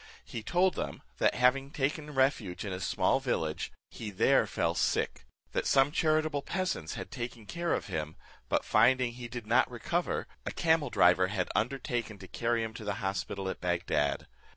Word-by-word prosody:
He 115 - -6
told 180 - +2
them, - - -5 0.2
that - - +3
having 130 +2 +3
taken 150 +1 -2
refuge 130 -9 +1
in 100 - -3
a 90 - -4
small 95 - +2
village, 80 -1 -2 0.2
he 110 - -6
there 100 - +3
fell - - 0
sick; - - 0 0.2
that - - -1
some 135 +1 +4
charitable 155 -2 +1
peasants 185 - -2
had - - -7
taken 120 -2 -6
care 170 +7 -2
of - - -4
him, 75 0 -4 0.3
but - - +1
finding 130 0 +4
he 120 0 -7
did 120 -2 -6
not 120 +5 +3
recover, 125 +9 -1 0.2
a - - -3
camel 160 -4 +2
driver 90 -3 +5
had 95 -2 -2
undertaken 120 -2 -1
to 95 - -11
carry 115 +2 0
him 110 0 -4
to 115 - -8
the 105 - -2
hospital 95 0 -3
at 95 - -4
Bagdad. 85 -5 0
120 Hz, 175 wpm, -31 LUFS, 95-140 Hz, 0.3 s, driver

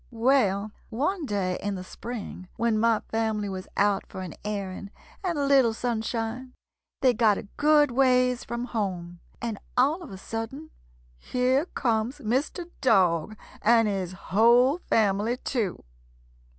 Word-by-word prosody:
"] - - -33 0.2
"Well, 210 -6 +2 0.2
one 300 - -1
day 190 -4 -1
in 205 0 -2
the 185 - -6
spring, 210 -3 -7
when 230 -2 +1
my 225 -1 +3
family 220 -2 0
was 190 -1 -6
out 200 -1 +2
for 190 - -8
an 180 - -7
airing 200 -2 -4 0.3
and 350 -4 -1
a 285 - +1
little 265 -5 +4
sunshine, 235 +2 -3 0.5
they 255 -2 +5
got 220 -3 +3
a - - -5
good 295 -1 +4
ways 250 -1 +3
from 235 +1 -4
home, 180 -7 -4 0.2
and 225 -3 -3 0.2
all 290 +8 +3
of 340 - -9
a 190 - -7
sudden 225 +10 -6 0.5
here 255 - +1
comes 230 -1 -1
Mr. 290 - -2
Dog 190 -4 +3 0.2
and 230 0 +4
his 190 -3 -2
whole 235 - +4
family, 215 +2 +2
too. 230 -8 -2
225 Hz, 145 wpm, -26 LUFS, 200-255 Hz, 0.5 s, they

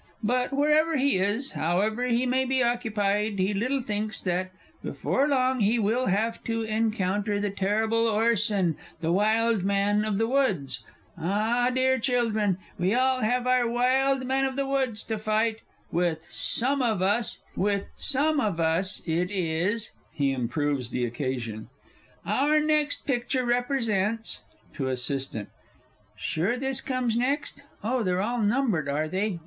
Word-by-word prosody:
But, 250 +3 +1
wherever 300 +3 +3
he 270 -7 +2
is, 205 +8 0
however 210 +9 0
he 240 +1 +1
may 260 +1 +2
be 260 -1 +1
occupied, 215 -3 0
he 190 +2 +1
little 255 +6 -1
thinks 210 -1 -2
that, 185 0 -1 0.3
before 275 +2 0
long, 260 -2 +2
he 215 +3 +3
will 230 +4 +1
have 220 +4 0
to 225 0 -1
encounter 210 -2 0
the 205 -1 -1
terrible 220 +4 +1
Orson, 210 -6 +1 0.2
the 165 0 0
Wild 215 +2 +2
Man 200 +1 +2
of 215 -2 -1
the 225 - +2
Woods! 195 - 0 0.4
Ah, 215 +8 +1
dear 260 +1 +2
children, 225 -6 +1 0.2
we 185 +5 +2
all 260 0 +2
have 245 +3 +1
our 250 -2 +3
Wild 260 +2 +2
Man 265 +1 +1
of 265 -1 -2
the 275 0 0
Woods 265 -5 -1
to 220 -2 -3
fight. 215 +1 +1 0.3
With 165 -2 0
some 270 +3 +1
of 220 -7 +1
us 210 +4 +1 0.2
it 195 - 0
is 185 +3 -1 0.2
(He 140 -2 +1
improves 130 0 -1
the 125 -1 -1
occasion). 120 -3 -4 0.6
Our 280 - +2
next 300 -1 +1
picture 250 -1 0
represents 230 -4 0 0.3
(To 135 -4 -3
ASSISTANT). 130 -4 -2 0.7
Sure 190 +10 -1
this 265 0 -2
comes 255 -3 -1
next? 260 +5 -1 0.2
Oh, 245 +3 0
they're 185 -3 0
all 240 +2 -1
numbered, 210 - +1
are 150 +2 0
they? 190 +3 -1
220 Hz, 140 wpm, -26 LUFS, 190-255 Hz, 0.7 s, wherever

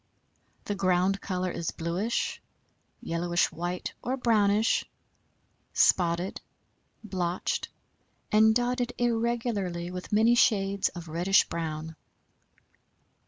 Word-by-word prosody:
The 205 - -2
ground 190 0 +1
color 185 -2 -2
is 170 -1 -3
bluish, 175 +8 -2 0.6
yellowish 175 +1 0
white 175 +2 -4
or 260 +2 -2
brownish, 220 -2 +3 0.9
spotted, 175 +1 +2 0.6
blotched 185 -4 -2 0.6
and 220 +1 +5
dotted 245 0 0
irregularly 230 -7 -1
with 180 0 -7
many 220 +3 +4
shades 200 -5 +2
of 175 -2 -9
reddish 175 +5 +3
brown. 160 -1 -4
195 Hz, 90 wpm, -28 LUFS, 175-220 Hz, 0.9 s, and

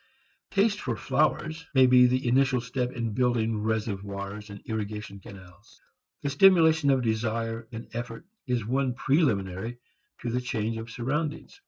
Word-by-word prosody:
Taste 205 +1 +2
for 120 - -2
flowers 155 +6 0
may 130 -1 +7
be 125 0 +7
the 130 0 0
initial 130 +1 +3
step 125 +1 -2
in 115 -3 -3
building 115 -3 +1
reservoirs 105 -1 -3
and 100 0 -9
irrigation 105 -2 -5
canals. 95 +2 -15 0.4
The 140 - -1
stimulation 160 -2 +5
of 135 -2 +3
desire 115 0 -2
and 115 0 -7
effort 120 +3 -6 0.2
is 125 -3 0
one 130 +1 0
preliminary 115 - 0 0.5
in 120 -1 -2
the 125 - 0
change 115 -3 -2
of 115 +1 -7
surroundings. 150 - -3
120 Hz, 145 wpm, -27 LUFS, 110-135 Hz, 0.5 s, may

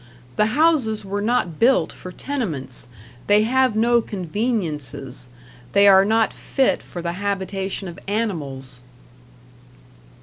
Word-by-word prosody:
The 210 - +3
houses 260 -10 +2
were 200 +1 -3
not 210 -8 0
built 235 -9 +3
for 185 - -10
tenements, 165 - -4 0.4
they 210 +1 +5
have 255 0 +2
no 235 +2 +3
conveniences, 165 - -3 0.4
they 200 0 +6
are 195 0 +7
not 220 +1 +2
fit 270 -2 0
for 175 - -8
the 170 0 -2
habitation 195 0 -3
of 170 - -9
animals. 145 - -3
200 Hz, 115 wpm, -22 LUFS, 170-225 Hz, 0.4 s, are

